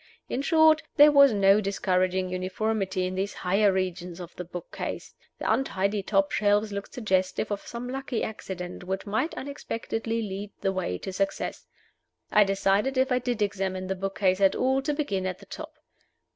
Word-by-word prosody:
In 260 - -2
short, 315 +1 +5
there 295 0 +8
was 280 -2 +7
no 200 0 +5
discouraging 185 -2 0
uniformity 190 +1 -1
in 185 - -3
these 195 +2 -2
higher 195 +3 +2
regions 185 -2 -3
of 175 -1 -9
the 180 - -5
book 175 0 -8
case. - - -5 0.2
The - - +1
untidy 200 -5 0
top 195 0 +1
shelves 210 0 +2
looked 200 +4 -6
suggestive 190 -3 0
of 205 - -2
some 235 +1 -6
lucky 265 -2 -3
accident 180 -4 -6
which 190 +1 -3
might 220 +10 -1
unexpectedly 230 -4 -3
lead 200 0 -5
the 195 - +1
way 185 - -2
to 190 - -6
success. 195 +1 -2 0.6
I 210 - +6
decided, 195 +6 +1
if 260 +1 +2
I 250 - +3
did 245 -3 -1
examine 190 -2 -2
the 190 +1 -2
book 195 +1 -4
case 185 -1 +2
at 195 - +5
all, 265 +1 +2
to 295 +2 -1
begin 200 -11 -1
at 185 -1 -3
the 200 - -15
top. 315 +9 -8
200 Hz, 180 wpm, -27 LUFS, 185-230 Hz, 0.6 s, there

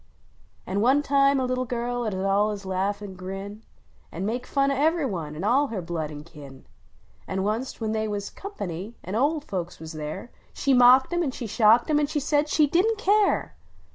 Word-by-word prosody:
An 195 +2 -1
one 265 +5 +4
time 275 -1 +3
a 260 - 0
little 255 0 -1
girl 245 0 -2
ud 210 -3 -2
allus 200 +1 0
laugh 195 +2 -1
an 200 -2 -7
grin. 195 +3 -7 0.5
An 180 +4 -4
make 245 +4 -3
fun 275 0 +1
of 275 - -1
ever 320 0 +2
one. 165 -8 -5
an 160 - -6
all 265 +7 +3
her 225 -6 -4
blood 165 -3 -4
an 150 -1 -8
kin; 145 -5 -13 0.6
An 190 - -3
onc 225 +5 -1
t, - - -9
when 220 -2 -2
they 220 0 -1
was 205 -1 -4
"company," 205 - -6
an 185 - -6
olc 285 +6 +1
folks 180 - -5
was 160 0 -8
there, 155 +9 -6 0.2
She 275 - +1
mocked 255 +4 +6
em 345 - +1
an 315 - 0
shocked 230 -1 +3
cm. 300 -1 +2
an 295 - +1
said 295 0 0
she 305 0 +4
didn 365 +10 +2
t 425 - -11
care! 410 0 +2
225 Hz, 200 wpm, -25 LUFS, 190-275 Hz, 0.6 s, mocked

